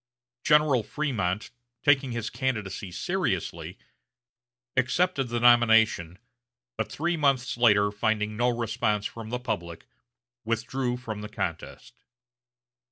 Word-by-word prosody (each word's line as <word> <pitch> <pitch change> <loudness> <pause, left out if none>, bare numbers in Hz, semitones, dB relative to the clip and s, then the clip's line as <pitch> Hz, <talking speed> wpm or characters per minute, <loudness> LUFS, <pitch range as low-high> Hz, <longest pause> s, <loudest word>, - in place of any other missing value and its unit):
General 150 -5 +4
Frémont, 110 -8 -2 0.3
taking 135 -3 +3
his 115 -2 -3
candidacy 105 -8 -3
seriously, 130 - -2 1.0
accepted 135 +3 +1
the 120 0 -2
nomination, 110 -7 +4 0.6
but - - -3
three 170 +3 -1
months 135 -5 +1
later, 105 -4 +4
finding 105 0 -1
no 120 +3 +2
response 115 -3 -1
from 115 0 -6
the 125 - -2
public, 85 -9 -5 0.6
withdrew 120 +2 -2
from 110 -4 -6
the 105 - -7
contest. 85 -6 -5
115 Hz, 105 wpm, -27 LUFS, 105-130 Hz, 1.0 s, General